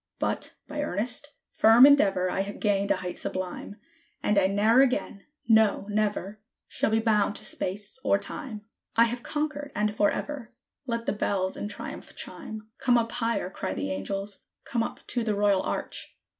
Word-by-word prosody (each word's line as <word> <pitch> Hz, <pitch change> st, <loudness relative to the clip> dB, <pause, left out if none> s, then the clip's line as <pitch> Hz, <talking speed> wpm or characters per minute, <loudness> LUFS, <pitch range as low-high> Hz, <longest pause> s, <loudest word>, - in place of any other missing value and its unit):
But, -, -, -2 dB
by 295 Hz, 0 st, -3 dB
earnest, 250 Hz, +5 st, -3 dB, 0.2 s
firm 225 Hz, +4 st, +8 dB
endeavor, 195 Hz, -10 st, +5 dB
I -, -, 0 dB
have 200 Hz, +1 st, -5 dB
gained 200 Hz, -1 st, +1 dB
a 200 Hz, -, +4 dB
height 180 Hz, -1 st, -5 dB
sublime; 185 Hz, +2 st, -4 dB, 0.5 s
And 210 Hz, -1 st, +4 dB
I 190 Hz, -, +4 dB
ne'er 215 Hz, +6 st, +4 dB
again 250 Hz, -6 st, 0 dB, 0.2 s
no, 220 Hz, -3 st, +4 dB
never! 210 Hz, -1 st, -1 dB, 0.3 s
shall -, -, 0 dB
be 220 Hz, -, +3 dB
bound 210 Hz, -2 st, +2 dB
to 215 Hz, -, -7 dB
Space 205 Hz, +4 st, -3 dB
or 200 Hz, -, +4 dB
Time; 210 Hz, +2 st, -6 dB, 0.3 s
I 230 Hz, -, +7 dB
have 235 Hz, +1 st, -1 dB
conquered! 295 Hz, 0 st, -3 dB
and 210 Hz, 0 st, 0 dB
forever! 240 Hz, +4 st, -1 dB, 0.3 s
Let 230 Hz, -1 st, -2 dB
the -, -, +1 dB
bells 190 Hz, -2 st, -1 dB
in -, -, -4 dB
triumph 205 Hz, -, -7 dB
chime! 220 Hz, 0 st, -6 dB
"Come 245 Hz, -2 st, +4 dB
up 230 Hz, 0 st, 0 dB
higher!" 230 Hz, -6 st, -1 dB
cry 190 Hz, -, -4 dB
the 95 Hz, -, -2 dB
angels: 195 Hz, -, -4 dB, 0.2 s
"come 235 Hz, -, -1 dB
up -, -, -4 dB
to 240 Hz, -, -1 dB
the 215 Hz, -2 st, 0 dB
Royal 200 Hz, -2 st, +3 dB
Arch! -, -, -4 dB
210 Hz, 170 wpm, -27 LUFS, 200-235 Hz, 0.5 s, firm